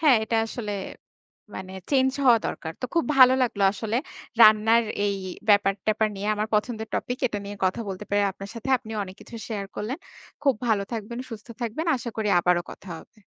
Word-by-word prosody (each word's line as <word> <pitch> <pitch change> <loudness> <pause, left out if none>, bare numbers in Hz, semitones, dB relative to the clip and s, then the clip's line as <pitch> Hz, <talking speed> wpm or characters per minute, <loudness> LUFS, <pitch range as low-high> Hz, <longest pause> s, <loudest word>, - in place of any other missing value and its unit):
হ্যাঁ, 295 -6 +6
এটা 225 +1 0
আসলে 220 -2 -5 0.8
মানে 190 0 -7 0.2
চেঞ্জ 265 -2 +4
হওয়া 240 -3 +7
দরকার। 160 - -5
তো - - 0
খুব 335 - +2
ভালো 255 0 +9
লাগলো 225 -5 0
আসলে 220 +2 -2 0.5
রান্নার 220 +2 +6 0.2
এই 200 -1 0 0.3
ব্যাপার-ট্যাপার 205 +1 +3
নিয়ে 200 +2 -3
আমার 215 +1 -2
পছন্দের 220 +1 -1
টপিক। 245 +1 -2
এটা 210 -4 -3
নিয়ে 205 +1 -7
কথা 185 +5 0
বলতে 195 +1 -5
পারি 205 0 +3
আপনার 195 +1 -9
সাথে। 230 +2 -7
আপনিও 220 -3 -6
অনেক 185 0 -11
কিছু 235 - -10
শেয়ার 205 -3 -3
করলেন। 245 +8 -3 0.4
খুব 275 -2 +4
ভালো 210 -3 +2
থাকবেন, 230 +1 -5
সুস্থ 220 -2 -8
থাকবেন। 240 +8 -3
আশা 235 -1 -5
করি 220 -1 -1
আবারো 175 0 +2
কথা 195 - -12
হবে। 220 - -18
220 Hz, 185 wpm, -25 LUFS, 205-235 Hz, 0.8 s, ভালো